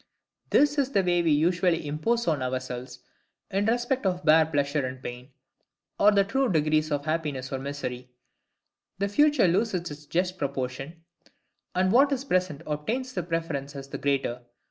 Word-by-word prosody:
This 290 0 +3
is 275 -2 +1
the 195 - +3
way 175 -1 +2
we 170 - +1
usually 170 +2 +2
impose 175 +11 -1
on 155 -5 +1
ourselves, 130 0 -4 0.5
in 200 +2 +1
respect 240 +3 0
of 180 -1 -2
bare 155 0 +6
pleasure 145 -1 0
and 130 0 -4
pain, 125 0 -8 0.7
or 205 - +7
the 200 -1 +4
true 265 +4 0
degrees 155 -1 +1
of 145 -1 -1
happiness 150 -5 -2
or 135 - -2
misery: 130 -3 -5 0.9
the 200 +1 0
future 290 +1 +4
loses 180 -2 0
its 145 0 -10
just 180 +4 -1
proportion, 135 +4 -4 0.7
and 185 +1 +2
what 275 +5 +5
is 270 0 -1
present 185 - 0
obtains 230 - -3
the 180 - -1
preference 165 -5 -3
as 135 0 -8
the - - -6
greater. 135 -3 -1
160 Hz, 165 wpm, -27 LUFS, 140-195 Hz, 0.9 s, or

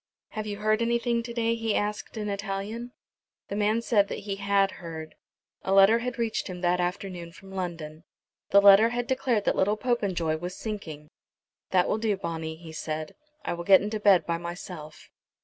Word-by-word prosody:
"Have 215 0 -5
you 205 -1 -4
heard 215 +1 +1
anything 235 0 +1
to 235 +1 -7
day?" 230 -1 +1
he 225 -2 -1
asked 210 +2 -2
in 210 -1 -3
Italian. 200 +4 -4 0.6
The 200 - -3
man 215 +2 +1
said 210 -4 +3
that - - -5
he 200 -1 -3
had 200 -1 +2
heard. 160 -2 -7 0.5
A 190 - -2
letter 195 +4 +6
had 250 +1 -4
reached 230 -2 -1
him 180 -2 -7
that 180 0 +2
afternoon 180 -1 -3
from 195 +2 -14
London. 165 -4 -5 0.5
The 200 - +6
letter 200 +3 +8
had 245 0 -2
declared 255 -5 0
that - - +2
little 205 +3 +2
Popenjoy 190 -10 0
was 180 +3 -6
sinking. 160 -9 -6 0.6
"That 180 -1 +3
will 220 - 0
do 215 -3 0
Bonni," 160 -3 -4
he 160 0 -11
said. 155 0 -4 0.3
"I - - -1
will 170 0 -5
get 190 +1 +6
into 210 +1 -3
bed 195 -6 +5
by 170 0 -1
myself." 170 -3 -8
200 Hz, 185 wpm, -27 LUFS, 175-220 Hz, 0.6 s, letter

